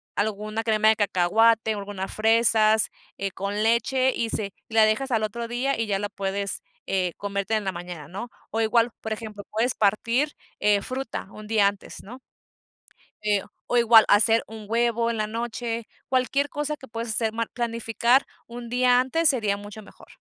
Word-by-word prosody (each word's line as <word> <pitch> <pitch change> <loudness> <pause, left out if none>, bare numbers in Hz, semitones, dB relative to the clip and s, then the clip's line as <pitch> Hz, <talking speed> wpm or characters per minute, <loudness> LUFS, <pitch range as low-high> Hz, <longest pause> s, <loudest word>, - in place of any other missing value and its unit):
alguna 215 +1 -2
crema 220 -1 +3
de 220 - +5
cacahuate, 220 +3 +3
alguna 200 -2 -5
fresas, 220 -1 +3 0.3
eh, 195 -1 -3
con 200 +3 -3
leche 255 +3 +2
y 230 -1 -1
se 200 -2 -2 0.2
la 220 -1 +4
dejas 255 +5 0
al 225 - +2
otro 230 +2 -3
día 245 +1 -1
y 225 - -1
ya 195 -1 0
la 205 0 -3
puedes, 200 0 -3 0.2
eh, 185 -3 -1
comértela 200 +1 -1
en - - -8
la 190 - 0
mañana, 175 -4 -8
¿no? 230 +7 -6 0.2
O 225 - -1
igual, 230 +1 +2
por 220 - -3
ejemplo, 215 -2 -8
puedes 235 +4 0
partir, 230 +8 +1 0.2
eh, 205 -1 +3
fruta 255 -3 -5
un 215 0 -11
día 210 -2 +4
antes, 200 0 -6
¿no? 250 +6 -11 1.0
Eh, 210 -2 +1 0.3
o 245 - +1
igual 230 -2 +7
hacer 225 +2 +5
un 220 -1 -9
huevo 235 0 +1
en 230 - -2
la 215 - -1
noche, 230 0 -4 0.2
cualquier 270 +2 +1
cosa 295 +1 -2
que 270 -3 -14
puedas 230 +1 -5
hacer 220 0 0
ma 230 0 -1
planificar 235 +2 +1 0.2
un 235 0 -8
día 250 0 +4
antes 300 +6 +2
sería 215 -7 +1
mucho 205 +1 -10
mejor. - - -17
220 Hz, 180 wpm, -25 LUFS, 205-235 Hz, 1.0 s, igual